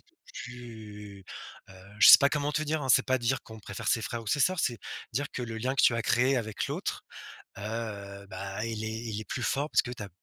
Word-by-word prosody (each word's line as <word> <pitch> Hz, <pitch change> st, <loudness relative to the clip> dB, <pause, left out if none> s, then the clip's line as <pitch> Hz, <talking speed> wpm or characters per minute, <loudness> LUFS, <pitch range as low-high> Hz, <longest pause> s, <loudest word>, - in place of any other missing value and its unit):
peu -, -, -33 dB, 0.3 s
plus, 105 Hz, -5 st, -10 dB, 0.5 s
heu, -, -, -13 dB, 0.2 s
je 105 Hz, -, +8 dB
sais -, -, +13 dB
pas 140 Hz, -, +4 dB
comment 150 Hz, 0 st, -1 dB
te 150 Hz, -, 0 dB
dire, 155 Hz, +1 st, -1 dB
hein, 135 Hz, -, -3 dB
c'est 120 Hz, -, +5 dB
pas 130 Hz, 0 st, +2 dB
dire 120 Hz, +2 st, 0 dB
qu'on 110 Hz, 0 st, -11 dB
préfère 100 Hz, +1 st, -5 dB
ses 115 Hz, -2 st, +2 dB
frères 115 Hz, +1 st, -4 dB
ou -, -, -15 dB
ses 145 Hz, -, +1 dB
sœurs, 185 Hz, +5 st, +3 dB
c'est 120 Hz, -2 st, 0 dB, 0.3 s
dire 140 Hz, +5 st, -1 dB
que 125 Hz, -, -4 dB
le 115 Hz, -1 st, -5 dB
lien 130 Hz, +4 st, -1 dB
que 130 Hz, -, +2 dB
tu 120 Hz, -, +6 dB
as -, -, 0 dB
créé 125 Hz, +4 st, +3 dB
avec 110 Hz, -3 st, -2 dB
l'autre, -, -, -3 dB, 0.6 s
heu, 100 Hz, -2 st, -5 dB
bah 95 Hz, +2 st, -5 dB
il 110 Hz, -1 st, -4 dB
est 110 Hz, -, -2 dB
il 110 Hz, -1 st, -4 dB
est -, -, -7 dB
plus 120 Hz, -, -4 dB
fort 140 Hz, +7 st, 0 dB
parce -, -, +4 dB
que 120 Hz, -, -6 dB
tu 120 Hz, -, -7 dB
as 100 Hz, -, -6 dB
115 Hz, 250 wpm, -29 LUFS, 105-130 Hz, 0.6 s, sais